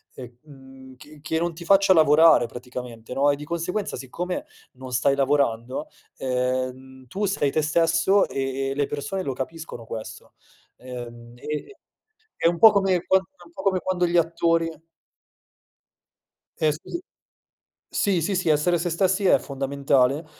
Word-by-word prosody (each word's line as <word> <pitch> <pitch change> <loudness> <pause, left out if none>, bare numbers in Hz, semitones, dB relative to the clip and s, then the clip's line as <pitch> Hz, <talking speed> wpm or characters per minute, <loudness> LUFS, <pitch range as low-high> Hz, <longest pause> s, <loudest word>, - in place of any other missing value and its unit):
ehm, 130 +1 -13
che 150 +4 -15
che 160 +2 -2
non 170 0 -1
ti 170 +1 -10
faccia 195 0 +5
lavorare 155 -4 +6
praticamente, 125 -1 -8
no, 140 +2 +3
e 145 - +3
di 145 - -9
conseguenza, 170 +5 -3
siccome 175 +8 -5 0.3
non 130 0 -10
stai 130 +3 +2
lavorando, 135 -1 0 0.3
ehm, 130 0 -3
tu 195 - -3
sei 165 -8 0
te 155 - +1
stesso 165 +5 +2
e 135 0 -2
e - - -1
le 145 0 -1
persone 145 +7 -4
lo 135 -7 -3
capiscono 130 -2 -7
questo. 110 -1 -8 0.4
Ehm, 120 -2 -9
e 150 - -6 0.6
è - - 0
un 170 0 +2
po' 220 +3 +9
come 195 -3 +1
quando 190 0 +2 0.2
un 335 - -19
po' - - -8
come 190 -2 +1
quando 180 -1 0
gli 170 - 0
attori 165 0 +2 1.9
Eh 155 -1 +2
sì. 250 - -7 0.9
Sì, 190 -4 +1
sì, 190 +4 -1
sì, 180 -2 0
essere 155 +4 +2
se 175 +2 -2
stessi 190 +4 +1
è - - +5
fondamentale. 140 +1 0
145 Hz, 150 wpm, -24 LUFS, 130-170 Hz, 1.9 s, po